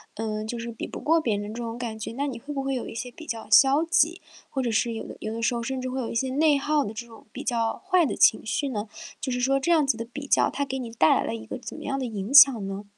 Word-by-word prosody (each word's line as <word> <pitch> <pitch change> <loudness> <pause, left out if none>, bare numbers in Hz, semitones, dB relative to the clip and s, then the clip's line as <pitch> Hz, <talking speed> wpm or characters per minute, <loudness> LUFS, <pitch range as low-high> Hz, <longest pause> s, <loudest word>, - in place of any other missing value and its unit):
嗯， 215 0 -3
就 240 - -4
是 235 0 -5
比 225 - -6
不 - - -8
过 330 +2 +3
别 235 -9 0
人 205 +1 -5
这 240 - -6
种 230 0 -5
感 225 -3 -5
觉。 225 - -5
那 275 +4 -2
你 255 - -5
会 295 +4 -7
不 275 - -3
会 270 0 -1
有 250 - -3
一 - - -8
些 245 +1 -5
比 320 +5 -12
较 225 -1 -5
消 275 +4 +6
极， 335 0 +2 0.3
或 265 - -2
者 235 - -1
是 230 +1 +1
有 225 - -5
的 - - -9
有 215 0 -4
的 230 - -5
时 240 - +2
候 235 - -2
甚 260 +2 -3
至 255 - -3
会 260 +1 -3
有 235 - -3
一 - - -6
些 260 +3 0
内 295 +2 +3
耗 295 +1 +1
的 210 - -5
这 235 +2 -6
种 225 -1 -16
比 - - -6
较 230 -2 0
坏 360 -3 +4
的 - - -2
情 220 - +4
绪 275 +6 -1
呢？ 210 -3 -4 0.3
就 270 - -4
是 250 - -1
说 270 +2 +2
这 340 +6 0
样 310 -3 +4
子 270 -5 +1
的 230 - -4
比 280 +5 -8
较， - - +3
它 285 - -2
给 265 -1 -4
你 240 -3 -5
带 225 -9 +4
来 - - 0
了 115 - -3
一 110 -1 -8
个 - - -6
怎 - - -8
么 - - -9
样 275 -1 -2
的 260 - -2
影 215 +2 -5
响 270 -8 +8
呢？ 195 +1 -6
245 Hz, 345 characters per minute, -26 LUFS, 225-275 Hz, 0.3 s, 响